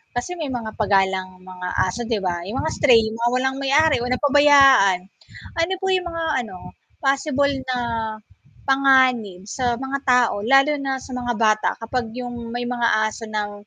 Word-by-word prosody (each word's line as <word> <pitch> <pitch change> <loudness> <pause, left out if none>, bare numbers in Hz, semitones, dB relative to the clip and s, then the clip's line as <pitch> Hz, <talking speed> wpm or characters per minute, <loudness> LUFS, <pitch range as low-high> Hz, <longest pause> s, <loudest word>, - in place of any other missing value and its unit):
kasi 245 +9 -3
may 295 -4 -4
mga 220 -2 -6
pa 215 - +1
galang 190 -1 +1 0.2
mga 180 0 -7 0.2
aso 185 +6 -4
'di 220 -3 0
ba? 175 - -1
Yung 220 +6 -4
mga 315 - -2
stray, 245 -6 +5
yung 220 +1 -5
mga 240 +1 +1
walang 265 +1 0
may-ari 295 +3 +3
o 245 - -3
napabayaan. 275 -7 +5 0.6
Ano 345 +3 0
po 385 - -3
yung 360 -1 -2
mga 330 0 -4 0.2
ano, 205 -6 -10 0.5
possible 280 +1 +1 0.2
na 250 - 0 0.9
panganib 260 -8 +3
sa 255 - -4 0.2
mga 275 +1 -3
tao, 245 -2 +3 0.2
lalo 275 +2 +5
na 270 - -1
sa 265 - -12
mga 245 -1 -2
bata, 215 0 +2
kapag 235 +1 -3
yung 245 -1 -6 0.2
may 245 0 -3
mga 240 -1 0 0.2
aso 225 +1 -7
ng 210 -1 -2
250 Hz, 175 wpm, -21 LUFS, 220-275 Hz, 0.9 s, stray